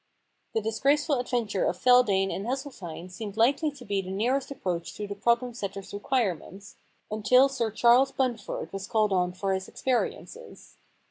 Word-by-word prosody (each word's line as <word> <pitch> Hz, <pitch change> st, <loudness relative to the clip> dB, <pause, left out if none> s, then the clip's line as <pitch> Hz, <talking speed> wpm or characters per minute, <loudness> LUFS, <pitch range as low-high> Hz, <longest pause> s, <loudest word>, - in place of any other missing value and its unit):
The 225 Hz, -, +2 dB
disgraceful 275 Hz, +6 st, +1 dB
adventure 235 Hz, -6 st, -1 dB
of 175 Hz, -, 0 dB
Feldane 210 Hz, -5 st, +4 dB
and 200 Hz, +4 st, -4 dB
Hesseltine 200 Hz, -, -5 dB
seemed 205 Hz, +2 st, -7 dB
likely 275 Hz, +7 st, +3 dB
to 265 Hz, -3 st, -12 dB
be 200 Hz, -1 st, 0 dB
the 185 Hz, -, -9 dB
nearest 245 Hz, +8 st, 0 dB
approach 180 Hz, -11 st, -4 dB
to 210 Hz, -, -4 dB
the 200 Hz, -, -5 dB
problem 235 Hz, +4 st, +1 dB
setter's 200 Hz, -3 st, -6 dB
requirements, 200 Hz, -, -2 dB, 0.3 s
until 250 Hz, +5 st, +5 dB
Sir 250 Hz, -5 st, -1 dB
Charles 240 Hz, +5 st, +4 dB
Bunford 245 Hz, -9 st, -3 dB
was 195 Hz, 0 st, -5 dB
called 215 Hz, -2 st, +2 dB
on 180 Hz, -1 st, +1 dB
for 195 Hz, +2 st, -2 dB
his 190 Hz, 0 st, -3 dB
experiences. 265 Hz, -, -4 dB
220 Hz, 155 wpm, -27 LUFS, 195-255 Hz, 0.3 s, until